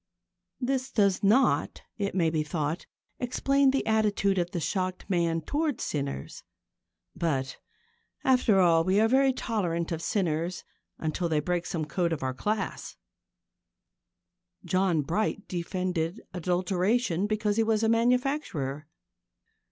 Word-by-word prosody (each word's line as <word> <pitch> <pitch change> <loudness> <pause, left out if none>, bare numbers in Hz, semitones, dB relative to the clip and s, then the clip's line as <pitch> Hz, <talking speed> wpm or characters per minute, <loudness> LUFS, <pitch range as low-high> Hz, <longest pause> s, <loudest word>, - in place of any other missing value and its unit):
This 260 0 -1
does 200 -6 +2
not, 220 +7 +2
it 200 -2 -3
may 165 -4 +2
be 155 -1 0
thought, 155 +1 -3 0.3
explain 275 +2 +2
the 270 -5 0
attitude 205 -3 +2
of 175 0 -1
the 175 - -3
shocked 185 +2 -2
man 170 -3 +1
towards 295 - -1
sinners. 140 - -4 0.7
But, 135 -5 -2 0.6
after 250 -6 +4
all, 165 -3 +5
we 190 +3 +2
are 220 - +5
very 265 +3 +4
tolerant 180 -10 -2
of 165 -1 -2
sinners 175 -3 -1 0.3
until 165 +2 -2
they 155 -2 +2
break 175 +3 -1
some 160 -3 -2
code 170 +2 0
of 150 - -4
our 130 0 -1
class. 205 +9 -3 1.7
John 185 -5 +2
Bright 205 +6 -1
defended 180 +1 -2
adulteration 185 +3 0
because 215 0 0
he 225 - +4
was 220 0 +1
a - - +3
manufacturer. 230 - 0
185 Hz, 130 wpm, -28 LUFS, 165-220 Hz, 1.7 s, all